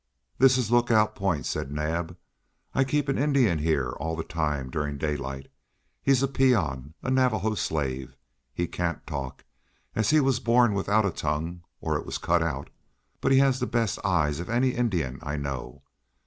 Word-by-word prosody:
"This 130 Hz, 0 st, +6 dB
is 120 Hz, -3 st, -1 dB
Lookout 115 Hz, -3 st, +4 dB
Point," 95 Hz, -8 st, -1 dB
said 65 Hz, -, -3 dB
Naab. 80 Hz, +3 st, -2 dB, 0.6 s
"I 135 Hz, -, +3 dB
keep 145 Hz, +2 st, 0 dB
an 135 Hz, -, 0 dB
Indian 135 Hz, -, +3 dB
here 75 Hz, -5 st, +1 dB
all 80 Hz, +5 st, -3 dB
the 80 Hz, -, -3 dB
time 75 Hz, -5 st, -2 dB
during 75 Hz, -1 st, -2 dB
daylight. 70 Hz, -3 st, -3 dB, 0.6 s
He's 135 Hz, -1 st, +3 dB
a -, -, +3 dB
peon, 85 Hz, -, +1 dB
a 130 Hz, -, -1 dB
Navajo 110 Hz, -5 st, +2 dB
slave. 65 Hz, -8 st, -2 dB, 0.4 s
He 85 Hz, -, -1 dB
can't 85 Hz, 0 st, -3 dB
talk, 70 Hz, -5 st, -6 dB, 0.5 s
as 110 Hz, -, +1 dB
he 155 Hz, +1 st, +5 dB
was 135 Hz, -3 st, +2 dB
born 120 Hz, -2 st, +4 dB
without 100 Hz, +2 st, +2 dB
a 100 Hz, -, +1 dB
tongue, 80 Hz, +3 st, -3 dB, 0.2 s
or -, -, 0 dB
it -, -, -8 dB
was -, -, -3 dB
cut 85 Hz, 0 st, +1 dB
out, 70 Hz, -4 st, -3 dB, 0.5 s
but -, -, +1 dB
he 135 Hz, -, +6 dB
has 135 Hz, -1 st, +4 dB
the 125 Hz, -, -1 dB
best 115 Hz, -3 st, 0 dB
eyes 80 Hz, -6 st, +1 dB
of 85 Hz, -, -6 dB
any 125 Hz, +3 st, +2 dB
Indian 90 Hz, -, -1 dB
I 75 Hz, -1 st, -3 dB
know. 70 Hz, -3 st, -5 dB
85 Hz, 175 wpm, -27 LUFS, 75-120 Hz, 0.6 s, This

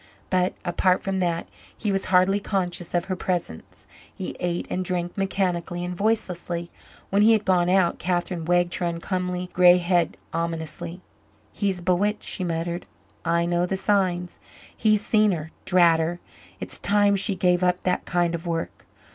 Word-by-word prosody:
But, 185 Hz, 0 st, +1 dB
apart 180 Hz, +1 st, +2 dB
from 195 Hz, -1 st, -1 dB
that, 170 Hz, -2 st, -1 dB, 0.3 s
he 210 Hz, -, -1 dB
was 195 Hz, 0 st, 0 dB
hardly 185 Hz, +2 st, +3 dB
conscious 180 Hz, -4 st, -2 dB
of 175 Hz, -, +1 dB
her 190 Hz, -1 st, -2 dB
presence. 175 Hz, -, -4 dB, 0.3 s
He 185 Hz, -, -6 dB
ate 175 Hz, -1 st, -2 dB
and 185 Hz, -, -1 dB
drank 175 Hz, -1 st, -2 dB
mechanically 180 Hz, -3 st, -1 dB
and 180 Hz, 0 st, -4 dB
voicelessly. 180 Hz, -5 st, -1 dB, 0.4 s
When 200 Hz, +1 st, +3 dB
he 220 Hz, +2 st, +6 dB
had 215 Hz, -2 st, +1 dB
gone 180 Hz, -2 st, +3 dB
out, 185 Hz, -2 st, +2 dB
Catherine 175 Hz, -2 st, -2 dB
wagged 175 Hz, 0 st, +2 dB
her 175 Hz, -, -1 dB
uncomely 180 Hz, +1 st, -3 dB
grey 180 Hz, 0 st, +7 dB
head 175 Hz, -1 st, +1 dB, 0.2 s
ominously. 165 Hz, +1 st, -4 dB, 0.5 s
"He's 195 Hz, -3 st, -1 dB
bewitched," 190 Hz, +4 st, +1 dB
she 190 Hz, -, -3 dB
muttered. 170 Hz, 0 st, -3 dB, 0.4 s
"I 170 Hz, 0 st, +1 dB
know 175 Hz, +1 st, +1 dB
the 190 Hz, -, -1 dB
signs. 185 Hz, -3 st, 0 dB, 0.4 s
He's 215 Hz, -1 st, +2 dB
seen 215 Hz, -2 st, +3 dB
her 160 Hz, -1 st, -5 dB
drat 170 Hz, -3 st, +5 dB
her! 170 Hz, +2 st, -1 dB, 0.4 s
It's -, -, -7 dB
time 205 Hz, 0 st, +3 dB
she 200 Hz, +1 st, +1 dB
gave 180 Hz, 0 st, +2 dB
up 180 Hz, 0 st, +1 dB
that 180 Hz, -1 st, 0 dB
kind 175 Hz, -1 st, +1 dB
of 170 Hz, +1 st, -4 dB
work. 165 Hz, -1 st, -4 dB
180 Hz, 165 wpm, -24 LUFS, 175-190 Hz, 0.5 s, grey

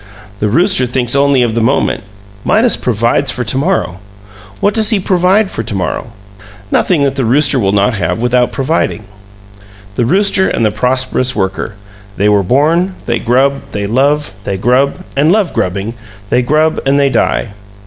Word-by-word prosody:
The 105 Hz, -, 0 dB
rooster 170 Hz, -, +2 dB
thinks 125 Hz, 0 st, -1 dB
only 140 Hz, -2 st, +3 dB
of 115 Hz, -2 st, -1 dB
the 115 Hz, -, 0 dB
moment; 130 Hz, +5 st, 0 dB, 0.4 s
Midas 230 Hz, +2 st, +2 dB
provides 120 Hz, +4 st, 0 dB
for 125 Hz, -, -2 dB
to 115 Hz, -, -2 dB
morrow. 145 Hz, -, -1 dB, 0.6 s
What 205 Hz, -, +1 dB
does 220 Hz, -2 st, +2 dB
he 215 Hz, -, +2 dB
provide 190 Hz, +2 st, +2 dB
for -, -, -3 dB
to 110 Hz, -2 st, -5 dB
morrow? 95 Hz, +4 st, -3 dB, 0.6 s
Nothing 165 Hz, -6 st, +2 dB
that 140 Hz, -1 st, -1 dB
the 135 Hz, -, 0 dB
rooster 135 Hz, +3 st, +2 dB
will 95 Hz, -4 st, +1 dB
not 100 Hz, +4 st, +2 dB
have 90 Hz, -4 st, -2 dB
without 125 Hz, +1 st, +1 dB
providing. 135 Hz, -5 st, -1 dB, 0.9 s
The 120 Hz, +3 st, 0 dB
rooster 195 Hz, +3 st, +2 dB
and 115 Hz, -, 0 dB
the 105 Hz, -, +2 dB
prosperous 130 Hz, +2 st, 0 dB
worker: 95 Hz, +1 st, -3 dB, 0.4 s
they 100 Hz, -, 0 dB
are 105 Hz, -1 st, +3 dB
born, 160 Hz, -, +1 dB
they 120 Hz, -1 st, -1 dB
grub, 135 Hz, +3 st, +1 dB
they 100 Hz, 0 st, -2 dB
love; 140 Hz, +6 st, 0 dB
they 100 Hz, -2 st, -3 dB
grub 130 Hz, -, +1 dB
and 150 Hz, +4 st, +3 dB
love 205 Hz, -3 st, +1 dB
grubbing; 100 Hz, +5 st, -2 dB, 0.4 s
they 125 Hz, -, +3 dB
grub 155 Hz, +5 st, +1 dB
and 140 Hz, +1 st, +2 dB
they 140 Hz, -1 st, +2 dB
die. 110 Hz, -, 0 dB
130 Hz, 170 wpm, -13 LUFS, 115-155 Hz, 0.9 s, only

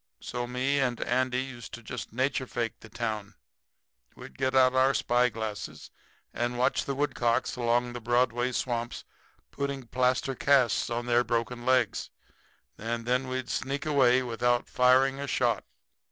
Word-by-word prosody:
So 120 Hz, 0 st, -4 dB
me 130 Hz, +3 st, 0 dB
and 125 Hz, -3 st, 0 dB
Andy 130 Hz, +1 st, +1 dB
used 120 Hz, -4 st, -8 dB
to 120 Hz, -, -13 dB
just -, -, -6 dB
nature 130 Hz, +2 st, -1 dB
fake 120 Hz, -2 st, -3 dB
the 115 Hz, -, -14 dB
town. 105 Hz, -3 st, -4 dB, 0.8 s
We'd -, -, -11 dB
get 130 Hz, 0 st, -1 dB
out 130 Hz, -1 st, +5 dB
our 130 Hz, +1 st, +3 dB
spyglasses 110 Hz, -4 st, -1 dB, 0.4 s
and 120 Hz, +1 st, -2 dB
watch 125 Hz, +1 st, +1 dB
the 140 Hz, -, -2 dB
woodcocks 130 Hz, -2 st, 0 dB
along 120 Hz, 0 st, +1 dB
the 120 Hz, -, -6 dB
Broadway 120 Hz, +1 st, +1 dB
swamps 120 Hz, -1 st, -2 dB, 0.5 s
putting 140 Hz, -2 st, -3 dB
plaster 125 Hz, +2 st, +1 dB
casts 130 Hz, -1 st, +3 dB
on 120 Hz, 0 st, -2 dB
their 120 Hz, 0 st, +3 dB
broken 120 Hz, +1 st, -2 dB
legs, 130 Hz, -4 st, +2 dB, 0.7 s
and 115 Hz, +1 st, -3 dB
then 125 Hz, +2 st, +1 dB
we'd 130 Hz, -1 st, -3 dB
sneak 140 Hz, +3 st, -2 dB
away 130 Hz, -4 st, +4 dB
without 120 Hz, 0 st, 0 dB
firing 130 Hz, +2 st, +4 dB
a 140 Hz, -, -4 dB
shot. -, -, +1 dB
125 Hz, 150 wpm, -28 LUFS, 120-130 Hz, 0.8 s, out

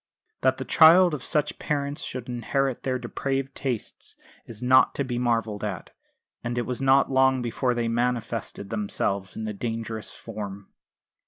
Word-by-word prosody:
That -, -, +3 dB
the -, -, -5 dB
child 170 Hz, +2 st, +7 dB
of 145 Hz, -, -3 dB
such 150 Hz, +1 st, -1 dB
parents 145 Hz, -1 st, -2 dB
should 125 Hz, -2 st, -6 dB
inherit 130 Hz, +2 st, -1 dB
their 130 Hz, -1 st, -1 dB
depraved 135 Hz, +1 st, -3 dB
tastes 125 Hz, -6 st, -4 dB, 0.3 s
is 115 Hz, -3 st, -9 dB
not 130 Hz, +1 st, +4 dB
to 140 Hz, -, 0 dB
be 120 Hz, -2 st, -3 dB
marvelled 115 Hz, -4 st, 0 dB
at. 100 Hz, -5 st, -4 dB, 0.5 s
And 120 Hz, +1 st, -3 dB
it 120 Hz, -, 0 dB
was 125 Hz, 0 st, -4 dB
not 135 Hz, +1 st, +4 dB
long 130 Hz, -1 st, +3 dB
before 120 Hz, +1 st, 0 dB
they 120 Hz, -1 st, 0 dB
manifested 115 Hz, -3 st, -2 dB
themselves 100 Hz, -2 st, -2 dB
in 110 Hz, -, -4 dB
a 105 Hz, -, -3 dB
dangerous 115 Hz, 0 st, -4 dB
form. 100 Hz, -3 st, -8 dB
120 Hz, 160 wpm, -26 LUFS, 110-135 Hz, 0.5 s, child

